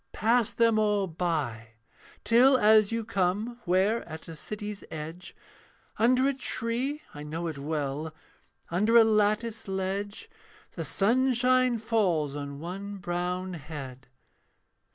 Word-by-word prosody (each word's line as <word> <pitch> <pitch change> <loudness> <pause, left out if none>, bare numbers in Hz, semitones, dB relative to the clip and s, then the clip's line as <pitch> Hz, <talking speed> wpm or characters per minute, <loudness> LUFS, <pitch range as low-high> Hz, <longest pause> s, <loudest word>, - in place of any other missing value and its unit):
'Pass 230 +1 +2
them 230 -2 +3
all 210 -2 +2
by: 150 -10 -3 0.5
till, 255 +4 +5
as 215 -2 +5
you 230 -1 -2
come 210 +4 -1
Where, 195 +6 +2
at 160 0 -8
a 165 - -8
city's 210 +4 -6
edge, 160 +3 -8 0.6
Under 255 +4 +4
a 280 - +2
tree 260 +3 -3
I 145 - -8
know 155 +3 -5
it 160 -4 -4
well 150 +1 -3 0.6
Under 210 +7 +4
a 230 - +9
lattice 215 +1 +1
ledge, 195 - -3 0.4
'The - - -5
sunshine 255 +2 +2
falls 190 -11 0
on 140 -1 -6
one 195 +5 -6
brown 180 +1 -3
head. 140 -5 -8
200 Hz, 125 wpm, -28 LUFS, 160-230 Hz, 0.6 s, a